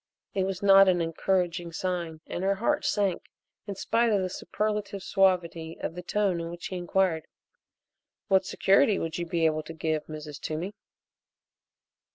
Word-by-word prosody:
It 190 -1 +1
was 190 0 -4
not 195 0 +8
an 180 -1 +3
encouraging 175 +1 0
sign 170 -2 -3
and 175 - -4
her 195 +1 +2
heart 295 +9 0
sank 205 -10 0 0.4
in 200 - -4
spite 230 +4 +1
of 200 -3 +2
the 185 - -3
superlative 210 -1 -3
suavity 170 -4 +1
of - - -3
the 180 - -6
tone 190 -2 0
in 165 - -5
which 175 0 -8
he 190 - -5
inquired: 180 -2 0 1.0
"What 190 -2 +4
security 195 +1 +3
would 165 +1 -3
you 170 - -3
be 165 -1 +1
able 155 -1 +2
to 155 +2 -9
give, 155 -1 -2
Mrs. 150 -2 -8
Toomey?" 165 +6 -4
180 Hz, 165 wpm, -28 LUFS, 165-195 Hz, 1.0 s, not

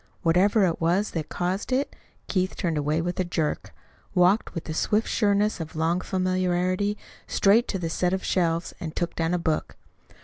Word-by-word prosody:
Whatever 190 +5 +4
it 165 -2 -1
was 180 +6 +1
that 160 -3 -4
caused 185 +6 -2
it, 265 +3 0 0.3
Keith 185 -1 0
turned 170 -3 -1
away 150 +2 0
with 175 +1 -3
a - - +3
jerk, 165 -3 -2 0.4
walked 180 +5 +3
with 165 - -3
the 155 - -5
swift 210 +7 +1
sureness 210 -1 +1
of 160 -1 -6
long 165 +3 +1
familiarity 185 +2 0 0.3
straight 215 +5 +4
to 195 - -2
the 175 -3 -3
set 175 +2 0
of 190 0 -1
shelves 170 -2 0
and 160 -1 -6
took 175 -1 -2
down 165 +1 0
a - - +1
book. 160 -2 -2
180 Hz, 180 wpm, -26 LUFS, 165-195 Hz, 0.4 s, Whatever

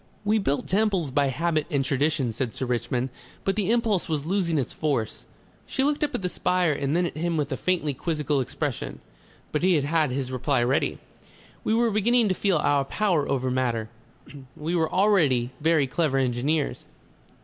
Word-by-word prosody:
"We 215 +1 +3
built 145 -8 -1
temples 195 -7 +1
by 140 +1 +2
habit 155 +3 0
and 140 -5 0
tradition," 140 -2 0
said 120 0 -3
Sir 130 - -2
Richmond. 125 +1 -1 0.3
"But 195 - 0
the 205 -2 0
impulse 225 -7 +1
was 150 -2 -1
losing 175 -2 0
its 135 - -2
force." 135 -8 -2 0.4
She 265 - 0
looked 295 +1 +1
up 290 -3 -1
at 205 - -3
the - - +1
spire 180 -1 +1
and 140 +1 -1
then 175 +1 +2
at - - -4
him 165 +1 -1
with 145 -2 -1
a - - 0
faintly 170 -6 0
quizzical 150 -1 -1
expression. 125 - -4 0.5
But 150 - 0
he 185 0 +4
had 150 +1 +1
his 130 0 -3
reply 130 0 +1
ready. 130 +4 +1 0.7
"We 220 - +1
were 235 0 +2
beginning 220 +2 +3
to - - +3
feel 190 -2 +1
our 145 -2 +2
power 175 -3 0
over 130 -1 0
matter. 120 -4 -1 0.7
We 160 +3 -3
were 160 -2 +1
already 155 - +3
very 160 -2 +3
clever 140 0 0
engineers. 135 +4 0
155 Hz, 180 wpm, -25 LUFS, 135-185 Hz, 0.7 s, he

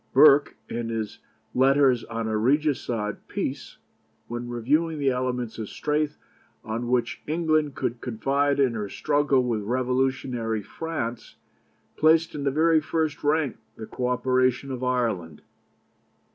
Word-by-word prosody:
Burke, 145 -1 +6
in 115 -1 -4
his 110 -2 -4 0.3
Letters 135 -2 +4
on 115 -1 -4
a 110 - -1
Regicide 120 -4 0
Peace, - - -4 0.5
when 120 +1 -5
reviewing 150 +7 +1
the 140 -2 +2
elements 125 -2 -2
of 110 - -5
strength 150 0 -1 0.5
on 115 +2 -3
which 125 0 0
England 155 -3 +1
could 120 0 -3
confide 140 +4 0
in 130 -4 +3
her 105 -3 -4
struggle 145 -1 +2
with 115 -3 -1
revolutionary 125 -1 -1
France, 125 -4 -5 0.6
placed 160 +1 +4
in 145 -1 -4
the - - +3
very 160 +3 +3
first 155 -1 -2
rank 150 -1 +1 0.2
the 110 - -7
co 125 +3 -3
operation 130 +1 +1
of 130 -1 -4
Ireland. 115 -11 -1
130 Hz, 130 wpm, -25 LUFS, 115-145 Hz, 0.6 s, Burke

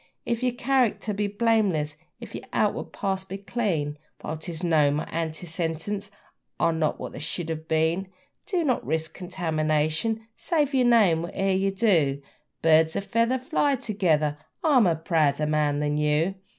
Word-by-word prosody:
If 235 0 -1
your 250 -1 +1
character 245 -4 +1
be 205 +1 -1
blameless, 200 -8 +1 0.2
if - - -10
your - - -7
outward - - 0
past 190 -1 -3
be 195 - -4
clean, 180 -9 -2 0.2
While 155 - -4
'tis 160 +1 -6
known 150 -4 +3
my 150 - -3
antecedents 165 +4 -3 0.5
are 165 - +3
not 160 -2 0
what - - -6
they - - -8
should 160 +2 -4
have 160 0 -4
been, 160 +4 +1 0.4
Do 365 -4 +1
not 255 -6 +1
risk 160 0 -2
contamination, 165 +3 -1
save 300 -5 0
your 255 -2 +3
name 205 -9 +5
whate'er 190 +3 -1
you 195 +1 +1
do 180 -10 +2 0.4
'Birds 160 0 +4
o' - - 0
feather 230 +5 +1
fly 280 +1 +1
together': 160 - 0 0.2
I'm 265 - +5
a 170 - +2
prouder 155 -3 +1
bird 150 -1 +1
than 150 0 0
you! 150 +5 +2
175 Hz, 160 wpm, -26 LUFS, 155-220 Hz, 0.5 s, name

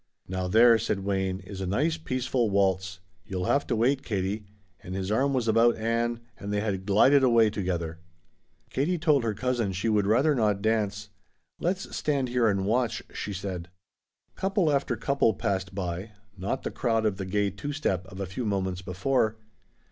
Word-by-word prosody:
"Now 95 0 -2
there," 115 +4 +6
said 105 -2 -1
Wayne, 95 -1 -1
"is 95 -2 -8
a 95 - -2
nice 150 - +1
peaceful 130 -6 -1
waltz. 95 -1 0 0.2
You'll 90 -1 -4
have 140 - +1
to 120 - 0
wait, 130 +5 +2
Katie," 100 0 -3 0.3
and 90 - -7
his 95 +1 -2
arm 135 +6 +2
was 125 -4 0
about 115 +2 +4
Ann 115 +1 -1 0.2
and 100 - -5
they 105 - +1
had 100 -2 -2
glided 130 +8 +5
away 115 -4 +5
together. 85 -5 -3 0.7
Katie 155 +7 0
told 150 -5 +3
her 110 -2 -1
cousin 120 -5 0
she 95 +5 -1
would 105 -2 +2
rather 130 +8 +4
not 105 -6 +1
dance. 105 -1 -1 0.5
"Let's 185 +3 -2
stand 140 -4 0
here 120 -1 +2
and 95 -2 +1
watch," 115 +2 0
she 105 - -4
said. 90 -3 -5 0.6
Couple 195 -4 +1
after 140 -3 +1
couple 125 -3 +2
passed 95 -1 -2
by, 95 +2 -4 0.2
not 100 +7 -3
the - - -3
crowd 115 -3 0
of 105 -3 +1
the 95 - -4
gay 100 +1 +1
two 100 +10 -5
step 95 - -1
of 95 +1 -10
a 100 - -2
few 95 +7 -5
moments 95 -4 -1
before. 110 +5 0
105 Hz, 180 wpm, -27 LUFS, 95-125 Hz, 0.7 s, there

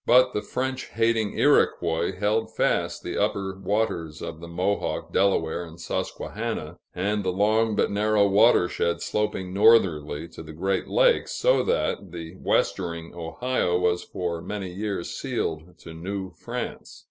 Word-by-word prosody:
But 125 +1 +6
the 105 - -1
French 130 +3 -3
hating 115 -1 0
Iroquois 85 +2 +2
held 105 +2 +1
fast - - 0
the - - -2
upper 95 -1 -1
waters 95 -6 -1
of 80 - -6
the 85 - -9
Mohawk, 90 +4 -2
Delaware, 90 -4 +2
and 85 0 -11
Susquehanna, - - -4 0.2
and 105 +3 0
the 95 - 0
long 110 +3 +2
but - - +1
narrow 105 0 +3
watershed 95 -5 +3
sloping 95 -3 -2
northerly 85 -8 +4
to - - -10
the 80 -1 -10
Great 95 +4 -1
Lakes, - - +3
so - - +3
that 460 - -1
the 85 -1 -7
westering 85 -3 -1
Ohio 90 +3 -1
was 90 -1 +1
for 85 -2 -4
many 100 -2 -5
years 100 -2 -3
sealed 80 +2 -3
to 80 - -10
New 95 +3 -5
France. - - -6
95 Hz, 145 wpm, -25 LUFS, 85-105 Hz, 0.2 s, But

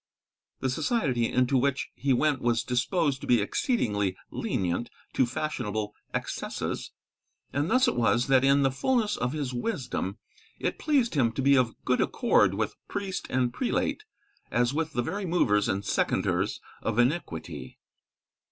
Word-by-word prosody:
The 130 - +1
society 140 - 0
into 125 +2 +2
which 140 +1 0
he 140 - -1
went 140 +1 +2
was 120 -1 +1
disposed 135 +3 0
to - - -7
be 120 - +5
exceedingly 105 - 0
lenient 90 +6 -1 0.2
to 130 - +3
fashionable 110 -6 -3 0.2
excesses. - - -3 0.6
And 145 +4 0
thus 255 +2 +4
it - - +1
was 120 +1 +2
that 135 -1 +4
in 140 +1 +4
the 135 - +3
fulness 215 - +1
of 125 +2 -2
his 145 -4 -3
wisdom, 120 - -3 0.4
it - - -2
pleased 275 -7 +2
him 125 -7 +3
to 135 - -2
be 140 +1 +6
of 125 -3 +2
good - - +2
accord - - +3
with - - -2
priest 195 -2 -4
and 125 -1 +1
prelate 260 - -1 0.5
as 120 +2 +1
with 160 +1 -1
the 120 - 0
very 195 +7 -3
movers 105 - +2
and 95 +1 -1
seconders - - 0 0.2
of 115 -1 -2
iniquity. 120 - -1
130 Hz, 150 wpm, -28 LUFS, 120-160 Hz, 0.6 s, be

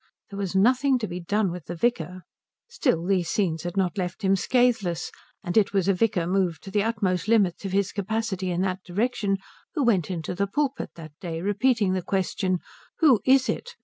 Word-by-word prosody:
There 200 - -6
was 195 -2 -3
nothing 255 +6 +4
to 225 -3 -3
be 175 0 -5
done 195 +2 0
with 175 -2 -7
the 175 - -5
vicar. 180 -3 -1 0.4
Still 250 - 0
these 180 -3 +1
scenes 170 -6 0
had 175 +3 -5
not 190 +1 0
left 180 +3 -4
him 195 0 +4
scathless, 225 -6 +1 0.3
and 175 - -3
it 210 -2 +3
was 195 -2 +1
a 195 - +4
vicar 195 -2 +1
moved 180 -3 0
to 195 - -8
the 205 - +2
utmost 200 -5 0
limits 205 -4 +2
of 195 - -3
his 200 0 +1
capacity 200 -2 -2
in 175 0 -1
that 185 0 -1
direction 205 +1 0 0.4
who 295 - +1
went 195 - +2
into 170 -3 -3
the 200 +3 -1
pulpit 280 +6 -1
that 155 -2 -10
day 165 -3 -4
repeating 205 +1 +2
the 185 - 0
question 185 0 0 0.4
"Who 280 -9 +5
is 265 0 +5
it?" 485 0 -3
195 Hz, 200 wpm, -25 LUFS, 180-220 Hz, 0.4 s, Who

